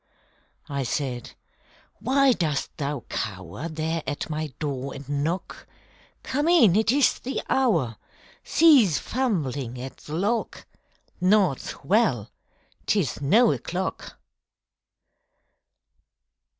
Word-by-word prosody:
I 140 -1 -3
said, 125 -1 -3 0.7
_Why 265 +1 +4
dost 150 -5 -2
thou 140 -2 -3
cower 95 - -5
There 160 +1 -2
at 145 +2 -3
my 155 +1 -2
door 140 -3 -4
and 135 -1 -9
knock? 145 +6 -3 0.6
Come 290 +4 -1
in! 280 - +6
It 220 +1 +3
is 280 0 +3
the 265 +2 -3
hour! 170 - +1 0.5
Cease 265 - +5
fumbling 145 - -2
at 130 +1 -7
the 150 - -8
lock! 210 +7 -1 0.6
Naught's 185 -6 +1
well! 165 - +1 0.6
'Tis 180 -10 0
no 220 - +5
o'clock! 185 +2 -4
160 Hz, 100 wpm, -25 LUFS, 140-220 Hz, 0.7 s, in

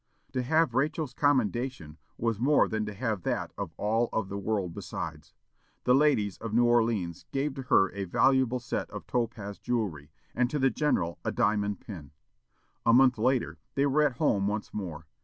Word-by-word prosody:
To 130 - 0
have 160 +5 +2
Rachel's 150 -1 0
commendation 125 - 0 0.2
was 115 -2 -1
more 145 +5 +4
than 110 -1 -2
to 105 - -5
have 110 -3 -2
that - - -2
of - - -5
all 115 +3 +1
of 105 -4 -2
the 100 - -4
world 100 -4 -1
besides. 80 -2 -7 0.5
The 125 - +4
ladies 130 -9 +2
of 110 -1 -4
New 120 +1 +5
Orleans 110 -8 +1
gave 140 +1 -1
to 135 - -6
her 95 - +5
a 100 0 -4
valuable 130 +5 +2
set 120 - -3
of - - -8
topaz 110 -4 -3
jewelry, 95 -12 -2 0.2
and 125 0 +1
to 150 - -2
the 135 -2 +3
general 85 - 0
a - - -1
diamond 105 -1 0
pin. 80 -10 -9 0.7
A 115 - +4
month 125 -2 +5
later, 115 -9 +1 0.2
they 140 - +3
were 145 +2 +3
at 145 -3 +3
home 100 -11 +2
once 105 +1 -3
more. 85 -6 -5
115 Hz, 180 wpm, -29 LUFS, 100-130 Hz, 0.7 s, New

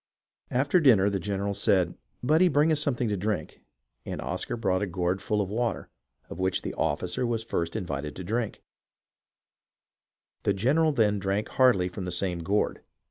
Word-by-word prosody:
"After 140 +8 +2
dinner 110 - +5
the 100 - -1
general 100 +1 -2
said, 95 -3 +2 0.3
'Budde, 160 +7 +4
bring 145 +3 +3
us 155 - +3
some 145 -3 +1
thing 120 0 -1
to 105 - 0
drink,' 100 -4 -3 0.4
and - - -5
Oscar - - -3
brought 95 -4 0
a 100 - 0
gourd 90 +1 -1
full 105 +2 0
of 95 - -3
water, 115 +1 -2 0.4
of - - -9
which 95 0 0
the - - -4
officer 85 +7 -1
was 115 -2 -1
first 85 -6 -2
invited 75 -8 -4
to 95 - -6
drink; 110 +4 -3 1.8
the 100 - +1
general 145 +11 +2
then 105 -7 +2
drank 100 +2 -1
heartily 125 -9 +4
from 90 +1 -6
the 90 - -4
same 90 0 -1
gourd. 100 +5 0
100 Hz, 175 wpm, -27 LUFS, 90-120 Hz, 1.8 s, dinner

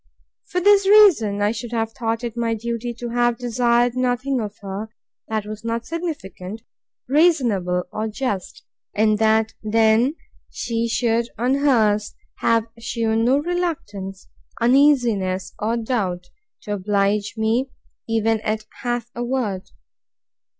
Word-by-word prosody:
For 360 - -1
this 400 +1 +5
reason 310 - +6
I 205 - +3
should 230 +1 -6
have 225 -1 -1
thought 230 -1 -3
it 235 -1 -4
my 230 -1 0
duty 235 +2 -3
to 240 0 -6
have 240 0 +1
desired 240 0 +1
nothing 255 +1 0
of 210 -2 -6
her, 200 +3 -5 0.4
that 215 -2 -2
was 215 +1 -7
not 230 0 -2
significant, 225 - -6 0.4
reasonable, 240 - +2
or 215 +1 -2
just; 205 -6 -4 0.3
and 215 0 +3
that 220 0 +3
then 225 +5 +3 0.3
she 230 -1 -2
should, 230 0 0
on 245 +3 +1
hers, 220 -7 +2 0.2
have 230 -1 +2
shewn 225 -1 0
no 260 +3 +4
reluctance, 290 - -3 0.3
uneasiness, 235 -8 +3
or 225 +3 0
doubt, 195 -7 -2 0.3
to 210 - -3
oblige 205 +1 0
me, 225 +5 +1 0.4
even 225 0 +1
at 215 0 -2 0.2
half 240 -1 -2
a 240 - -4
word. 235 -7 -2
230 Hz, 130 wpm, -22 LUFS, 210-245 Hz, 0.4 s, reason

